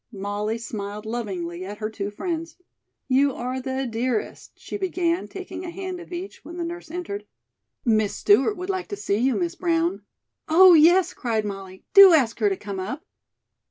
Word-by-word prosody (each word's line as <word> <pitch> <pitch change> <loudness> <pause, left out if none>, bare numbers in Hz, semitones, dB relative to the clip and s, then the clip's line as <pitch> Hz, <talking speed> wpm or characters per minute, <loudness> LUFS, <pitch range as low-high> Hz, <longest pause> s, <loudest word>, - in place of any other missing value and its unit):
Molly 205 +2 -3
smiled 210 -2 -6
lovingly 185 -7 -4
at 205 +2 -7
her 215 0 -4
two 205 -2 -4
friends. 330 - -4 0.5
"You 275 +1 +3
are 255 +2 -3
the 265 +1 -2
dearest 235 -1 -3
" - - -52
she - - -7
began, 360 -2 -1
taking 370 -2 -7
a 355 - -5
hand 370 0 -5
of 350 - -12
each 360 +3 -7
when 345 - -9
the 345 - -2
nurse 340 0 -6
entered. 295 - -5 0.6
"Miss 215 -3 +2
Stewart 410 0 +3
would 365 +1 -5
like 375 -2 -3
to 405 - -4
see 200 - -1
you, 255 +3 +2
Miss 345 -2 -1
Brown." 340 +1 0 0.5
"Oh, 360 +3 +8
yes," 345 +3 +5
cried 225 -4 -1
Molly; 195 -2 -7
"do 395 -2 +10
ask 250 -8 +3
her 210 -2 +3
to 195 - -2
come 200 -2 -6
up." 270 - -5
265 Hz, 185 wpm, -24 LUFS, 210-350 Hz, 0.6 s, do